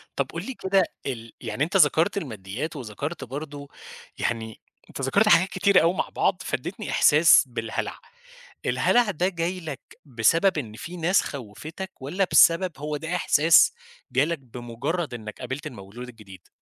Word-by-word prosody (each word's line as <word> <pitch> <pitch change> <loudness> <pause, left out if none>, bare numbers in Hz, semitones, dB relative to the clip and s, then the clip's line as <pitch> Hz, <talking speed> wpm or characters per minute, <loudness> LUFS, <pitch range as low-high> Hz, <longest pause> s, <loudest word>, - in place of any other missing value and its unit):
طب - - -1
قُل - - -6
لي 265 - -5
كده 190 -3 +2 0.2
ال 115 -4 -6
يعني 140 - -2
أنت 180 +5 +1
ذكرت 160 +3 +3
الماديات 110 - -5
وذكرت 135 +5 -5
برضو 140 +2 -8 0.5
يعني 110 -2 -3 0.3
أنت - - -7
ذكرت 200 +11 +2
حاجات 175 +1 +6
كتيرة 190 +1 +4
أوي 170 +2 +3
مع - - -2
بعض، - - 0
فادّيتني - - -4
إحساس - - +6
بالهلع. - - -4 0.7
الهلع 240 -4 +2
ده 180 +1 0
جاي 175 +1 -3
لك 155 -5 -7 0.2
بسبب 155 - +2
إن 110 -7 -4
في 170 +10 -8
ناس 175 +3 +3
خوّفتك 150 - -7
والّا 180 +8 -1
بسبب 170 +3 +5
هو 150 +1 -4
ده 165 +4 -4
إحساس 165 - +5 0.4
جالك 155 +4 +1
بمجرد 125 +5 -4
إنك 110 -3 -8
قابلت 130 +4 -5
المولود 120 +1 -10
الجديد؟ 100 -6 -14
150 Hz, 150 wpm, -25 LUFS, 120-175 Hz, 0.7 s, حاجات